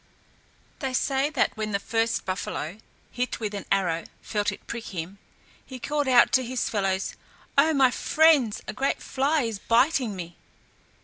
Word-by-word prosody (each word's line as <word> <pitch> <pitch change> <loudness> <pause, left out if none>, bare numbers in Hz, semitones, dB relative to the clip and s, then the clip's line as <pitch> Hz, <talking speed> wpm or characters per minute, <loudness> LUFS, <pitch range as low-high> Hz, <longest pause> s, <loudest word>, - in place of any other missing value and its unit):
They 265 -3 -3
say 270 +2 +1
that 285 -5 0
when 215 -1 -3
the 200 - +1
first 225 +2 -1
buffalo 185 -1 -4 0.3
hit 250 +1 -2
with 215 -2 -3
an 200 - -5
arrow 175 -4 +1 0.2
felt 210 0 -1
it 205 - -11
prick 235 -1 -6
him, 185 +2 -6 0.4
he 260 - -9
called 290 +2 -1
out 250 -2 +6
to 260 - +3
his 255 +1 -2
fellows, 195 -3 0 0.4
"Oh, 300 +3 +5
my 265 -2 +5
friends, 300 -7 +3
a - - -4
great 270 +6 0
fly 285 +2 0
is 225 -3 -3
biting 245 -1 +2
me." 175 -2 -8
230 Hz, 165 wpm, -26 LUFS, 200-265 Hz, 0.4 s, out